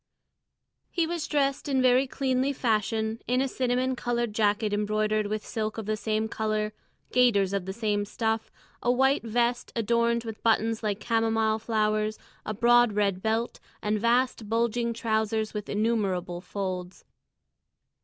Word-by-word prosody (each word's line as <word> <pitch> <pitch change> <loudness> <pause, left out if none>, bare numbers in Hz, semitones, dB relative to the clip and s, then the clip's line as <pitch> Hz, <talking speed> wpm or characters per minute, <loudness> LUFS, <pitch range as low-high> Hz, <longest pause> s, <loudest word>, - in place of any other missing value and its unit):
He 340 -2 0
was 330 -2 -3
dressed 280 -1 0
in 270 -2 +2
very 255 +1 +4
cleanly 265 +1 0
fashion 220 -2 0
in 250 +1 +2
a 270 - +1
cinnamon 255 0 0
coloured 240 -2 -1
jacket 210 0 +1
embroidered 215 0 0
with 215 +1 -3
silk 215 -1 -3
of 220 - -4
the 215 +1 0
same 215 0 -1
colour, 215 -1 -1 0.4
gaiters 205 -6 +3
of 195 -2 -2
the - - -2
same 205 -1 -1
stuff, 225 +1 -2 0.3
a 240 - +2
white 265 +3 +3
vest 240 +2 0
adorned 235 +1 +1
with 225 -2 -7
buttons 225 0 +2
like 210 -2 -2
chamomile 225 -1 +1
flowers, 215 -1 0 0.3
a 215 - -1
broad 240 0 +5
red 200 -2 +1
belt, 225 +2 -1 0.2
and 210 0 -1
vast 235 -2 +1
bulging 235 +1 +1
trousers 220 -1 -1
with 210 -1 -5
innumerable 195 -5 0
folds. 185 -2 -5
220 Hz, 145 wpm, -27 LUFS, 215-240 Hz, 0.4 s, broad